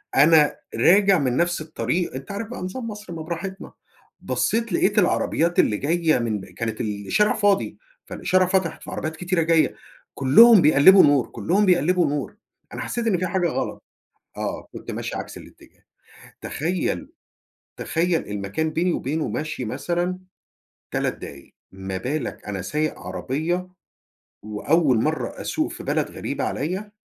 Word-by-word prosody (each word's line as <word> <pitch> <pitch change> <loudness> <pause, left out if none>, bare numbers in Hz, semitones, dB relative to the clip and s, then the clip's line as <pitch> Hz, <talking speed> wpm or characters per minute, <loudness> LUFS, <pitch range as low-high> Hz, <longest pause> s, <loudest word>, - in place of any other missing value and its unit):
أنا 150 +1 +5 0.2
راجع 190 - +5
من 130 -3 0
نفْس 175 -1 +1
الطريق، 155 +2 -2
أنت 135 +8 -7
عارف 205 +2 -4
بقى 245 - -7
نظام 210 +7 -5
مصر 210 -4 -8
ما 165 - -6
براحتنا، 175 +4 -6 0.5
بصّيت 230 -3 -1
لقيت 205 +5 +3
العربيّات 175 -2 +1
اللي 105 - +3
جايّة 160 +1 +1
من 110 -3 -1
ب - - -10
كانت 115 -1 -5
الشارع 105 - +1
فاضي، 205 -1 +1 0.3
فالإشارة 185 0 +1
فتحِت، 185 -3 -1
في - - -8
عربيات 160 0 -4
كتيرة 175 +1 -1
جايّة، 165 -1 +2 0.4
كلّهم 200 - +7
بيقلّبوا 155 +5 +7
نور، 145 -3 +3
كلّهم 200 +5 +1
بيقلّبوا 180 -1 +3
نور، 145 +5 -3 0.4
أنا - - -5
حسّيت 235 -1 -3
إن 200 -5 +2
في 185 +1 -1
حاجة 180 0 0
غلط - - -4 0.5
آه، - - -4
كنت - - -8
ماشي - - -4
عكس - - -6
الاتجاه. - - -17 0.6
تخيّل، 180 - -2 0.7
تخيّل 170 0 -1
المكان 105 +10 -2
بيني 170 +3 0
وبينه 155 +4 -2
مشي 155 -5 -4
مثلًا 175 +9 -2 0.7
3 - - -1
دقايق، 70 -1 -11 0.2
ما 95 0 -6
بالك 140 +8 -4
أنا 100 -2 -4
سايق 150 +10 -2
عربيّة 150 - -3 0.7
وأوّل 130 +6 +1
مرّة - - -2
أسوق - - -2
في - - -9
بلد - - -1
غريبة - - -4
عليّا، 190 +8 -3
165 Hz, 145 wpm, -23 LUFS, 135-185 Hz, 0.7 s, كلّهم